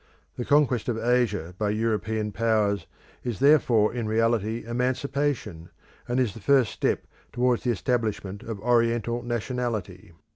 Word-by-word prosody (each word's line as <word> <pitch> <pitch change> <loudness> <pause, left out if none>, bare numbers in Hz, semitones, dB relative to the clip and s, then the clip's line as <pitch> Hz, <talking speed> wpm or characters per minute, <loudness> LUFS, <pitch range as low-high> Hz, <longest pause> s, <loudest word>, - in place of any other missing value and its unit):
The 120 - -4
conquest 140 -5 +2
of 115 - -1
Asia 115 -7 0
by 105 -1 +1
European 110 0 -1
Powers 105 -2 +1 0.4
is 120 -5 -3
therefore 125 -8 +4
in 120 -3 -3
reality 115 0 0
emancipation, 125 - -2 0.4
and 120 +2 0
is 120 -6 +1
the 115 - -10
first 130 0 +3
step - - -1 0.3
towards 125 -1 +1
the 125 - 0
establishment 110 -3 -1
of 110 -3 -6
Oriental 120 0 +1
nationality. 120 -6 -3
115 Hz, 135 wpm, -26 LUFS, 105-125 Hz, 0.4 s, therefore